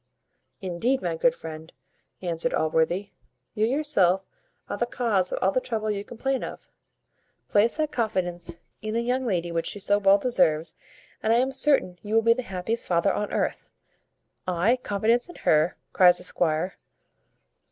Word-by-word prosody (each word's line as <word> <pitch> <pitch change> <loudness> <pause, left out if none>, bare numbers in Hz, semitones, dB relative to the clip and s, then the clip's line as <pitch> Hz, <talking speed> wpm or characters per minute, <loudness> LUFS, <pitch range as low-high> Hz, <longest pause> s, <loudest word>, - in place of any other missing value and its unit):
"Indeed, 195 +7 -1
my 170 -2 -1
good 245 +9 +2
friend," 160 -2 -9 0.5
answered 170 -2 -1
Allworthy, 160 +5 0 0.4
"you 215 0 +1
yourself 215 - +2 0.4
are - - -3
the 240 - -1
cause 210 -7 0
of - - -2
all 190 - +4
the 255 - 0
trouble 220 -3 -2
you 200 -1 -3
complain 265 +4 -2
of. - - -8 0.8
Place 215 +6 +2
that 310 -1 0
confidence 175 -7 -2 0.2
in 215 +1 -4
the 230 - +1
young 250 +1 -1
lady 175 -4 -1
which 165 0 -1
she - - -4
so 205 +1 +1
well 195 0 +5
deserves, 165 -9 +2 0.5
and 220 - +1
I - - +5
am 255 +3 +2
certain 265 -10 +2
you 210 +1 -3
will 225 - +4
be 230 +1 +6
the 255 - -4
happiest 205 +2 -3
father 180 +3 +2
on 210 - -2
earth." - - -2 0.8
"I 185 +8 +2
confidence 230 - 0
in 350 - -11
her?" 155 +2 +2 0.2
cries 180 -1 +6
the 180 - -5
squire. 175 0 0
200 Hz, 165 wpm, -26 LUFS, 175-235 Hz, 0.8 s, be